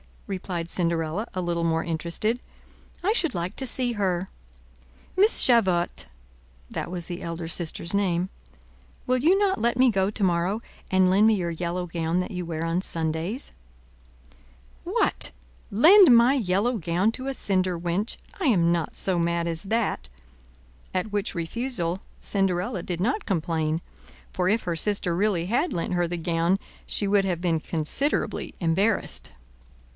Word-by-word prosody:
replied 180 -3 -4
Cinderella, 170 +4 -1
a 185 - -2
little 170 -1 -1
more 165 0 +1
interested; 170 +8 -1 0.6
"I 400 - +3
should 340 - +2
like 175 +1 -2
to 265 - -2
see 245 +1 0
her. 190 -4 -1 0.9
Miss 415 +4 +6
Javotte"—that 60 - -1
was 175 -1 -5
the 175 0 -6
elder 165 0 -5
sister's 170 +1 -2
name—"will 65 - -3
you 325 +9 +4
not 395 -1 +1
let 235 +1 +1
me 255 -1 +5
go 195 -1 +1
to 210 0 -3
morrow, 180 +4 +1 0.3
and 185 -1 +4
lend 200 +4 +5
me 220 - +5
your 175 -3 -2
yellow 175 +2 -3
gown 165 0 -1
that 180 - -5
you 180 -2 -4
wear 165 -1 -3
on 165 +2 0
Sundays?" 165 - -3 1.3
"What, - - 0 0.4
lend 320 - +8
my 235 +3 +6
yellow 225 0 +1
gown 175 +4 +1
to 255 +3 -6
a 270 - -1
cinder 185 -6 +1
wench! 175 +6 -2 0.2
I 375 - -1
am 175 - +4
not 170 -3 -1
so 185 -3 +2
mad 170 0 0
as 165 +1 -2
that;" 210 - -1 0.9
at 185 +3 -2
which 205 0 -2
refusal 180 0 -2 0.2
Cinderella 195 +1 0
did 175 0 -4
not 255 - 0
complain, 160 -3 -1 0.5
for 180 -1 -1
if 220 +4 +2
her 170 -2 -2
sister 200 -1 0
really 180 -2 +1
had 245 - +1
lent 170 +2 -2
her 175 -1 +1
the 175 +1 -3
gown, 170 +2 +1 0.3
she 205 - +1
would 200 0 +3
have 175 -3 -1
been 170 -3 +1
considerably 165 - -2
embarrassed. 190 +6 0
180 Hz, 150 wpm, -25 LUFS, 170-215 Hz, 1.3 s, lend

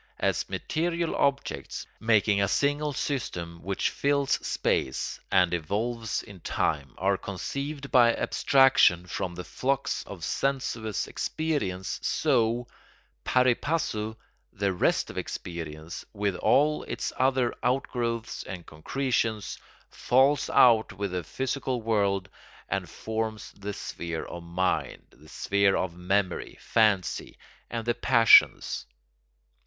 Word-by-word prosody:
As - - 0
material 170 +1 -1
objects, 140 -1 -1
making 110 -3 +3
a 100 - +3
single 145 +7 +1
system 85 - -3
which 95 +1 -1
fills 140 -1 +1
space 65 - -1
and 90 -2 +4
evolves 110 +7 -2
in 100 -2 -12
time, 70 -5 -1
are 95 +1 +1
conceived 140 - -5
by 120 -3 +6
abstraction 135 -10 +4
from 90 0 -4
the 90 - -6
flux 135 +8 -1
of 95 -5 -9
sensuous 125 -6 -1
experience, 120 - -2
so, 115 +1 +1 0.6
pari 125 -1 +4
passu, 110 -7 -2 0.4
the 100 -1 -1
rest 90 - +1
of - - -4
experience, 80 -1 -6
with 100 -2 -1
all 150 +2 +3
its - - -4
other 130 -2 +2
outgrowths 120 -3 -1
and 90 -3 -7
concretions, 110 - -2 0.3
falls 135 +3 +3
out 115 -3 +5
with 100 0 -3
the 90 -1 -2
physical 130 - -2
world 100 -4 +1 0.4
and - - -2
forms 110 -1 -4
the 100 +1 -6
sphere 85 -5 -5
of 85 - -7
mind, 90 +2 -1
the 75 +3 -18
sphere 100 -1 +2
of 90 -2 -2
memory, 90 +1 -1
fancy, 105 -6 +1 0.3
and 115 -1 -4
the 120 - +2
passions. 115 - +5
110 Hz, 115 wpm, -27 LUFS, 95-130 Hz, 0.6 s, by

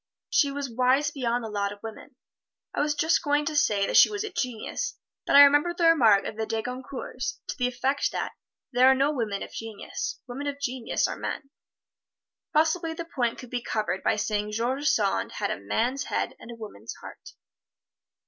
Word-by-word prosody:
She 285 -2 +3
was 280 0 -3
wise 255 +4 +2
beyond 245 -4 -1
the 225 - -5
lot 200 -1 -1
of 205 0 -11
women. 225 +4 -9 0.6
I - - -2
was 295 0 +1
just 320 +3 +2
going 290 -1 +1
to 305 - -2
say 205 -8 +2
she - - +8
was 415 -1 -3
a 430 - -5
genius, 255 +5 -3 0.3
but - - +3
I 285 - +12
remember 290 +5 +4
the 345 - -1
remark 230 -12 +5
of 210 - -5
the 220 0 -2
De 220 0 -2
Goncourts 255 0 -5
to - - -3
the 250 -3 +1
effect 260 +3 0
that, - - -3 0.4
"There 255 0 +5
are 265 - +7
no 275 +3 +2
women 220 -7 -2
of - - -9
genius 225 -2 -5
women 270 +4 -5
of 285 0 -3
genius 255 -3 -1
are - - -5
men." 275 -2 -5 1.0
Possibly 320 +1 +1
the 335 - -5
point 245 -8 -1
could 250 - -11
be 245 -1 -2
covered 210 -5 -2
by - - +2
saying 210 0 -1
George 255 +6 -1
Sand 205 -8 +1
had - - -2
a - - -3
man's 240 - -1
head - - -2
and - - -12
a 235 - -7
woman's 205 - -9
heart. - - -12
255 Hz, 195 wpm, -27 LUFS, 225-290 Hz, 1.0 s, I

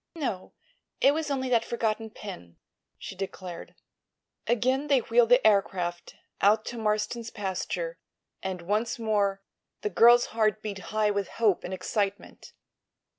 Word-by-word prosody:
"No; 245 - -4 0.5
it 275 - +5
was 310 -1 -2
only 265 -2 -1
that 235 -2 +3
forgotten 225 -1 -2
pin," 180 - -10 0.4
she 195 - -8
declared. 185 -2 -7 0.7
Again 255 +5 +1
they 275 -3 +4
wheeled 230 0 +3
the 245 0 +5
aircraft 180 -4 +1 0.3
out 215 +2 +4
to 240 - -5
Marston's 215 +2 -1
pasture, 210 - -4 0.4
and 185 -2 -4
once 215 +6 -1
more 205 -3 0 0.4
the 210 - -2
girl's 240 +5 +6
heart 215 -1 +1
beat 205 -2 -4
high 215 -1 +1
with 200 -2 -1
hope 215 -5 +2
and 180 - -6
excitement. 195 +2 -3
215 Hz, 135 wpm, -27 LUFS, 195-235 Hz, 0.7 s, girl's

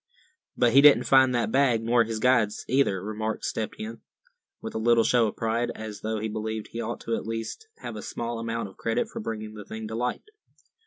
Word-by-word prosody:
"But 120 -2 +3
he 135 - +8
didn't 145 0 +7
find 130 -2 +5
that 120 -2 0
bag, 125 -4 +3
nor 120 +1 +4
his 115 0 -4
guides 110 -3 +2
either," 125 -8 +2
remarked 110 +1 -3
Step 110 - -2
Hen, 110 +2 -7 0.6
with - - -7
a - - -2
little 115 0 +4
show 115 0 +3
of 105 - -5
pride; 115 +2 -1
as 110 -1 -7
though 110 0 -2
he 110 +1 -2
believed 110 0 -4
he 115 - -4
ought - - -4
to 115 - -1
at - - -5
least 115 - -5
have - - -6
a - - -6
small 115 0 -4
amount 115 -1 -3
of 95 - -15
credit 115 0 -1
for - - -6
bringing 110 -1 -5
the 105 -1 -8
thing 110 +1 -7
to - - -6
light. 125 +2 -2
115 Hz, 220 wpm, -26 LUFS, 110-120 Hz, 0.6 s, he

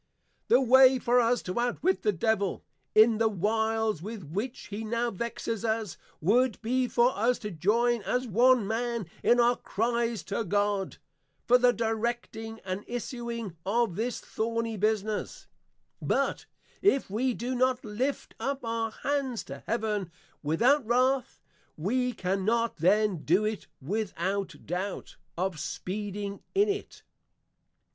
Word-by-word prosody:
The - - +6
way 260 +1 +7
for 245 0 +3
us 235 0 +1
to 180 +5 -3
out 245 0 -1
wit 375 +2 +2
the 210 - +2
Devil, 200 +1 0 0.3
in 220 0 +6
the 225 -1 +3
Wiles 220 -1 0
with 210 +1 -6
which 205 - -5
he 210 +2 -4
now 235 +2 -1
Vexes 230 +1 -4
us, 220 -3 -1 0.2
would 230 +6 +2
be 250 +3 +1
for 245 +1 +3
us 240 +4 +2
to 210 - -6
joyn 230 +7 +2
as 250 +5 -1
one 240 +2 +4
man 235 -1 -1 0.2
in 240 - +4
our 240 +1 +5
cries 230 -2 -1
to 200 +5 -2
God, 205 0 0 0.5
for 250 +1 +5
the 250 0 +5
Directing, 225 0 -3
and 190 +1 -4
Issuing 235 -4 -5
of 220 -1 +1
this 235 +4 -2
Thorny 230 0 -2
Business; 215 0 -1 0.6
but - - 0 0.3
if 375 -9 +3
we 245 +3 0
do 245 +3 -3
not 255 0 +1
Lift 245 +7 -2
up 275 -2 -3
our 230 0 -1
Hands 270 0 -2
to 140 0 -9
Heaven, 210 -5 -1 0.3
without 240 - +3
Wrath, 255 +3 +1 0.3
we 250 +10 0
cannot 210 +4 0
then 195 +3 +3
do 180 +7 +2
it 215 -1 -3
without 200 +3 -3
Doubt, 185 +3 -4 0.2
of 180 -3 -1
speeding 200 +4 -4
in 405 +2 +4
it. 405 0 -4
225 Hz, 140 wpm, -28 LUFS, 205-245 Hz, 0.6 s, way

